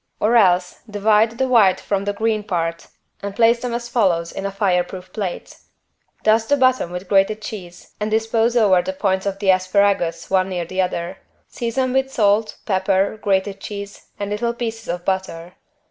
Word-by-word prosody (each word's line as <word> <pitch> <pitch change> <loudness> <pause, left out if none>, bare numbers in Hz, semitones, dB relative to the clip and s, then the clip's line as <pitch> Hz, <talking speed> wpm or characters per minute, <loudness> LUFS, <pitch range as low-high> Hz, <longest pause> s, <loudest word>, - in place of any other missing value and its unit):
Or 225 +3 +2
else 180 -5 +3
divide 215 +2 +2
the 265 +1 +1
white 220 -7 +4
from 200 -1 -2
the 205 - -1
green 220 0 -1
part 170 -4 -3 0.3
and 200 0 -5
place 235 +1 +4
them 245 - -3
as 235 0 -4
follows 180 -9 +1
in 195 - -4
a - - -5
fireproof 185 -2 -1
plate: 195 -5 -5 0.6
Dust 220 +1 +3
the 285 - +4
bottom 255 -8 +2
with 180 +1 -6
grated 195 +2 +2
cheese 185 -5 -9
and 210 0 -2
dispose 225 +2 +1
over 195 -6 +4
the 190 - -4
points 190 0 -1
of 195 -1 -2
the 195 -1 +3
asparagus 185 -3 +1
one 190 0 +2
near 175 -2 -3
the 185 +3 -1
other; 180 +1 -3 0.3
season 250 +2 -2
with 265 0 +1
salt, 215 -2 +1
pepper, 195 +1 +1
grated 195 0 0
cheese 200 -1 -8
and 205 0 -4
little 235 +3 -1
pieces 225 -1 -5
of 175 0 -4
butter. 185 -2 -3
200 Hz, 175 wpm, -20 LUFS, 185-225 Hz, 0.6 s, white